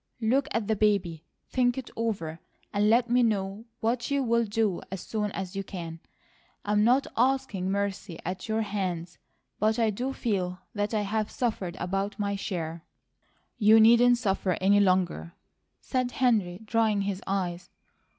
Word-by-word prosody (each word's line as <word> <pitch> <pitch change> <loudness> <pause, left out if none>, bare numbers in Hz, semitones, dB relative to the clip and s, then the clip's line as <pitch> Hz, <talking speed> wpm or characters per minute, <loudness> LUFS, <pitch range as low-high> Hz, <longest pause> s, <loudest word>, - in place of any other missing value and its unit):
Look 255 +5 +2
at 225 -3 -1
the 220 - +2
baby; 195 -6 +1 0.3
think 245 -1 +2
it 260 - -6
over; 195 -8 -2 0.3
and 205 +1 +3
let 235 +2 +4
me 245 +1 +3
know 205 -1 0 0.2
what 235 +1 0
you'll 235 -5 +2
do 210 -3 0
as 190 -2 -5
soon 210 -2 -2
as 190 0 -5
you 195 - -2
can. 170 -4 -7 0.7
I'm 210 0 +2
not 250 +5 +4
asking 250 -7 +1
mercy 200 -3 -2
at 185 +2 -4
your 220 0 +1
hands, 180 -5 -3 0.4
but 215 +1 +2
I 225 -2 +2
do 250 +6 -3
feel 190 -8 -2 0.2
that 205 +1 -1
I 210 - +2
have 210 +1 -1
suffered 200 -7 -2
about 195 +3 -2
my 200 -1 -1
share." 165 -4 -4 0.8
"You 220 +1 +7
needn't 235 +2 +6
suffer 195 -5 0
any 200 +2 +4
longer," 185 - +1 0.5
said 255 -1 -1
Henry, 215 -7 +1
drying 220 -2 +2
his 195 -1 -2
eyes. 180 -3 -2
205 Hz, 155 wpm, -28 LUFS, 185-230 Hz, 0.8 s, You